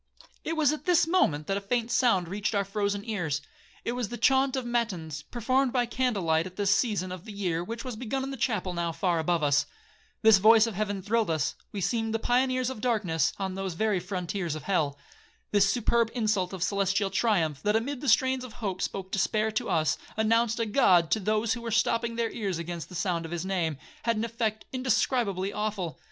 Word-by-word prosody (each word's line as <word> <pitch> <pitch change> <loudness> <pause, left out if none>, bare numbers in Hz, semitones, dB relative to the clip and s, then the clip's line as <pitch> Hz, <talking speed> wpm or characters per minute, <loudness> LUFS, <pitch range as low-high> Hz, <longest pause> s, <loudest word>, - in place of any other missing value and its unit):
'It 325 - -2
was 300 -3 +4
at 305 - -7
this 350 -2 +4
moment 165 - +2
that 195 +3 -1
a - - -3
faint 235 +3 -1
sound 195 -9 +3
reached 205 +4 -2
our 200 -1 +1
frozen 200 0 -2
ears;—it 175 +1 -4
was 245 -3 -3
the 240 - -5
chaunt 265 0 +3
of 260 -2 -2
matins, 185 -11 -2
performed 255 - 0
by 245 -1 +1
candlelight 195 -10 0
at 185 - -12
this 200 0 +2
season 205 -6 0
of 180 -1 -7
the 220 - -9
year, 180 -5 -2
which 230 +5 -6
was 250 -3 -4
begun 255 +4 -3
in 270 - -4
the - - -4
chapel 215 -7 -1
now 170 -1 -1
far 175 0 0
above 165 0 0
us. 145 -1 +3 0.6
This 220 -3 +7
voice 220 +2 +7
of 230 - -4
heaven 205 -1 -2
thrilled 225 0 +1
us,—we 165 +5 -3
seemed 225 +3 0
the - - +3
pioneers 255 +2 +1
of 220 - -8
darkness, 185 - +1
on 190 -1 -3
the 195 0 -3
very 200 +3 0
frontiers 180 -2 -3
of 155 - -7
hell. 150 -6 0 0.5
This 200 -1 +4
superb 235 -1 +2
insult 215 -6 0
of 190 -3 -3
celestial 195 0 +1
triumph, 175 -9 +1
that 210 +4 +1
amid 255 +4 -1
the 285 - 0
strains 260 -1 +3
of 250 -3 -9
hope 200 -6 -4
spoke 190 -1 -4
despair 215 +2 +1
to 215 - -2
us, 155 -4 +1 0.2
announced 230 +1 +2
a 230 - +1
God 180 -7 +4
to 220 - +3
those 215 +2 +1
who 235 - -5
were 235 - -4
stopping 230 +1 +1
their 230 -1 -1
ears 200 -6 -2
against 170 0 -5
the 180 - -10
sound 175 -1 -1
of 165 - -7
his 175 +1 -3
name, 170 -6 -1 0.2
had 230 -1 0
an 220 - 0
effect 225 -2 -2
indescribably 240 -6 0
awful. 205 -8 -3
210 Hz, 210 wpm, -28 LUFS, 180-235 Hz, 0.6 s, This